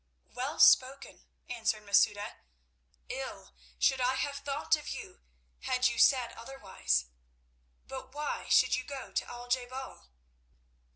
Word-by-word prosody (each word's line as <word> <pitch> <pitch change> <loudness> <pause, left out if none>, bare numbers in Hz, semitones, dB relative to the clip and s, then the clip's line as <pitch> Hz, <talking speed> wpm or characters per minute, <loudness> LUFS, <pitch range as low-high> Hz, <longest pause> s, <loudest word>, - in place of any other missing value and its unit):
"Well - - -4
spoken," 270 +2 +4 0.2
answered 225 -3 -2
Masouda. 205 +1 +2 0.7
"Ill - - -6 0.3
should 265 - +2
I 255 +1 +2
have 280 +1 -2
thought 285 +2 0
of 300 -1 -8
you - - -8 0.4
had 255 0 +1
you 235 - -4
said 255 -4 +4
otherwise. 195 - -2 0.8
But 265 0 -8
why 295 +1 -4 0.2
would - - 0
you - - -3
go 275 0 -8
to - - -2
Al 245 0 -8
je 250 +1 +1
bal?" 260 - -9
255 Hz, 130 wpm, -31 LUFS, 225-270 Hz, 0.8 s, spoken